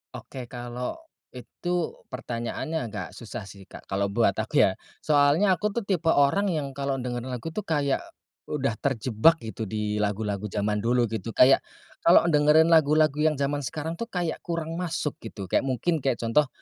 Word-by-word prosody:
Oke 125 -3 -8
kalau, 120 0 -5 0.4
itu 175 +7 -3 0.2
pertanyaannya 125 +4 -4
agak 100 -5 -5
susah 110 +2 -8
sih 100 0 -13
Kak - - -12
kalau 100 +1 +1
buat 100 - +2
aku - - +3
ya, - - +4 0.3
soalnya 150 +6 +4
aku 195 +4 0
tuh 235 - -1
tipe 175 -5 -1
orang 160 +8 +3
yang 150 -6 -2
kalau 140 0 -2
dengar 125 -1 -3
lagu 130 +6 -5
tuh 210 +3 -5
kayak, 145 -4 +1 0.5
udah 135 -6 -2
terjebak 130 +3 +3
gitu 110 -1 -5
di 105 0 -2
lagu-lagu 105 0 -1
zaman 105 +1 -1
dulu 120 +3 +2
gitu 115 0 -4
kayak, 135 +2 +7 0.4
kalau 170 0 +6
dengerin 150 +2 +5
lagu-lagu 155 -1 +4
yang 155 0 +3
zaman 140 +1 -1
sekarang 155 +4 -5
tuh 230 - -3
kayak 175 -6 -2
kurang 165 0 -4
masuk 170 -4 -3
gitu 110 -3 -8
kayak 135 - +2
mungkin 155 +6 0
kayak 130 -2 0
contoh, 130 +5 +3
140 Hz, 170 wpm, -26 LUFS, 115-160 Hz, 0.5 s, kayak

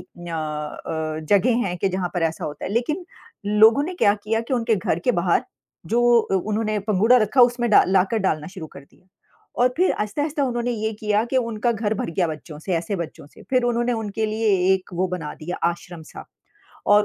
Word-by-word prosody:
अ - - -12 0.3
अ, 155 0 -4
जगह 230 +4 +3
हैं 180 -1 -3
कि 195 - +1
जहाँ 185 -1 -2
पर 175 - -1
ऐसा 160 0 -1
होता 145 -1 -6
है। - - -4
लेक़िन 300 - -1 0.4
लोगों 220 +6 +5
ने 365 +4 -5
क्या 205 - +3
किया 225 +1 0
कि 230 +3 -3
उनके 230 -2 +1
घर 185 -4 -1
के 250 - +3
बाहर 170 0 +2 0.5
जो 235 +2 +3 0.2
उन्होंने 215 +2 -1
पंघूड़ा 215 +5 +5
रखा 220 +3 +2
उसमें 240 0 +2
डा - - +7
लाकर 190 +4 +2
डालना 155 -7 -1
शुरू 180 -3 -8
कर - - -12
दिया। 140 +6 -24 0.6
और 250 - +6
फ़िर 365 +3 +3
आहिस्ता-आहिस्ता 290 +8 -2
उन्होंने 240 -1 -1
ये 220 -1 -2
किया 210 +1 +1
कि 250 +2 -2
उनका 235 -1 0
घर 220 -1 -1
भर 200 - -3
गया 175 +2 0
बच्चों 155 0 -8
से 185 - -4
ऐसे 170 +5 -2
बच्चों 170 -4 -7
से। 145 - -17
फ़िर 255 -2 +3
उन्होंने 240 0 +1
उनके 220 -1 -2
लिए 220 +1 -1 0.3
एक 190 +1 -6
वो 185 +2 +1
बना 175 -4 -4
दिया 175 +3 -6
आश्रम-सा 170 -1 -8 0.7
और 210 0 +5
210 Hz, 200 wpm, -22 LUFS, 175-235 Hz, 0.7 s, डा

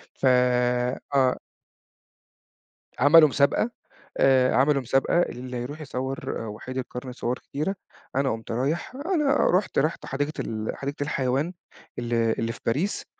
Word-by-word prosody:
ف - - -3
آه. 125 +1 +2 1.6
عملوا 155 +3 +7
مسابقة، 140 - +2 0.5
آآ 130 -1 +4
عملوا 140 +1 +3
مسابقة 135 +7 +2
اللي 125 -5 -4
يروح 140 +6 -6
يصوَّر 130 -4 -4
آآ، - - -6
وحيد 120 +5 -7
القرن 125 0 -5
صور 125 0 -3
كتيرة، 155 +8 -3 0.4
أنا 135 0 +2
قُمت 115 +1 -5
رايح 140 - -2
أنا 295 -1 +1 0.2
رحُت 190 - -1
رحُت 155 +4 -1
حديقة 145 +3 -2
ال 110 -1 -3
حديقة 140 +1 -4
الحيوان، 140 +4 -1 0.5
ال 120 0 -3
اللي 115 0 +1
في - - -10
باريس، 155 - -1
130 Hz, 130 wpm, -25 LUFS, 125-150 Hz, 1.6 s, عملوا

